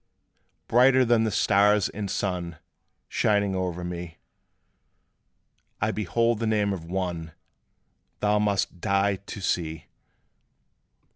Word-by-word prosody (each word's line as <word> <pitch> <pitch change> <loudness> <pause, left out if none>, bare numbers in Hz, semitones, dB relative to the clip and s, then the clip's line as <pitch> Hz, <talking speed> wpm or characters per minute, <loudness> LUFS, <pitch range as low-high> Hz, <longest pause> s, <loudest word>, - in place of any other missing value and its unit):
"Brighter 130 +2 +5
than 115 -1 +3
the - - +1
stars 105 0 +3
and 100 -1 -5
sun 90 -4 -3 0.5
Shining 100 -2 +1
over 90 -2 -3
me, 85 -1 -6 1.6
I 110 +1 +1
behold 115 +2 0
the 115 - -1
name 105 -2 +1
of 85 -4 -6
ONE 85 -3 -4 0.9
Thou 105 0 +2
must 100 -4 -1
die 100 0 +1
to 100 +2 -9
see!" 80 -4 -2
100 Hz, 110 wpm, -26 LUFS, 90-105 Hz, 1.6 s, Brighter